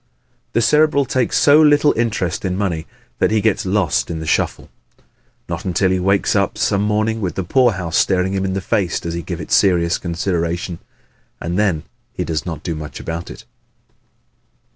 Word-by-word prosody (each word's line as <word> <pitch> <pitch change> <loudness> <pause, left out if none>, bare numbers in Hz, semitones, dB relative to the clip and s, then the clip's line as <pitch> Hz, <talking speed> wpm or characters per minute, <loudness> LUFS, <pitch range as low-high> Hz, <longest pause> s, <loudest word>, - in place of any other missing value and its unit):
The 115 - +2
Cerebral 150 +4 +3
takes 130 0 0
so 150 +2 +6
little 150 -1 +5
interest 105 -7 -1
in 95 -1 -1
money 85 -6 -2 0.3
that - - +3
he 110 0 +2
gets 105 -2 0
lost 85 -11 +1
in 85 - -3
the 80 - -5
shuffle. 75 - -1 0.8
Not - - -4
until 95 +1 +1
he 95 - +1
wakes 95 +2 +1
up - - +1
some 100 - +1
morning 110 +2 0
with 90 -5 -2
the 95 - -2
poorhouse 95 -6 +1
staring 95 0 +2
him 95 -1 -1
in 95 -1 -1
the 95 - -2
face 95 -1 0
does 85 - -5
he 85 - -3
give - - -6
it - - -8
serious 85 -3 +3
consideration. 85 -1 -2 0.6
And 85 +2 -3
then 90 -8 +1 0.3
he - - -3
does 80 +2 -3
not 80 - -5
do 85 - -2
much 75 -1 -7
about 85 +1 -5
it. - - -11
95 Hz, 185 wpm, -19 LUFS, 85-105 Hz, 0.8 s, so